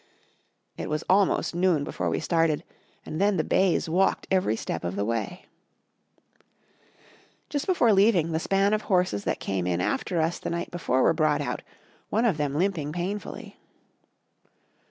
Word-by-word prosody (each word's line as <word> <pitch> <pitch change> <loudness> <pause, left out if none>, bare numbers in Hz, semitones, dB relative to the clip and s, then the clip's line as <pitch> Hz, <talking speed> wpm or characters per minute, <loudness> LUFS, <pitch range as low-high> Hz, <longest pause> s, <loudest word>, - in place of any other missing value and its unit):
It - - -5
was 155 +1 -2
almost 190 -1 +2
noon 175 -4 +2
before - - -3
we - - -1
started 165 -2 +1 0.4
and 155 - -4
then 200 -1 +3
the 160 - +1
bays 190 0 +2
walked 185 +4 +1
every 185 - +2
step 85 - -4
of 90 +2 -3
the 100 0 -1
way. 115 - -3 2.0
Just 290 +3 -3
before 245 - +4
leaving, 195 -5 +3
the 160 - 0
span 195 +4 +2
of 215 - +1
horses 180 - +1
that - - -1
came 95 -2 -2
in 90 -1 0
after 170 - -1
us 160 +2 0
the - - -4
night 170 0 -3
before 130 -7 0
were - - +4
brought 155 -2 +2
out, 145 - -3 0.5
one 225 +3 +1
of 200 -9 +2
them 145 -2 -1
limping 165 -4 0
painfully. 185 +5 -5
170 Hz, 160 wpm, -26 LUFS, 150-195 Hz, 2.0 s, before